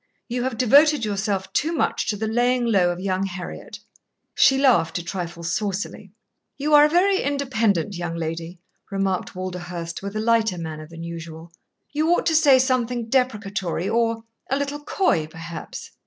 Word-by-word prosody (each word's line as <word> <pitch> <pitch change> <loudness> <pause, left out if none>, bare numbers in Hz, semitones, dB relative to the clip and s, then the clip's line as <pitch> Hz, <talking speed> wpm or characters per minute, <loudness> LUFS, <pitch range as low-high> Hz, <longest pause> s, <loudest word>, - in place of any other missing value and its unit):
You 245 0 -2
have 260 -3 -2
devoted 280 +3 +5
yourself 195 -2 -2
too 315 +2 +1
much 320 - 0
to 210 - -1
the 220 - -2
laying 240 +2 +1
low 195 -6 +3
of 175 0 -3
young 190 0 -1
Heriot." 180 -1 -7 0.6
She 270 - +5
laughed 255 - +3
a 175 - -4
trifle 170 -1 -5
saucily. 195 +1 -3 0.5
"You 295 +2 -1
are 295 0 +9
a - - +2
very 380 +4 +3
independent 230 - 0
young 175 -1 -4
lady," 165 +1 -4 0.3
remarked 195 -2 -2
Walderhurst, 180 -2 -5
with 200 +1 -6
a - - -1
lighter 220 -3 +2
manner 155 -2 -6
than 165 +1 -9
usual. 165 0 -8 0.4
"You 310 +2 +1
ought - - -2
to 325 - +2
say 290 -4 +6
something 250 -3 0
deprecatory 205 -8 -1
or 230 +1 0 0.3
a 270 - +1
little 285 +1 -3
coy, 170 - +1
perhaps." 165 +1 -8
205 Hz, 165 wpm, -23 LUFS, 175-255 Hz, 0.6 s, are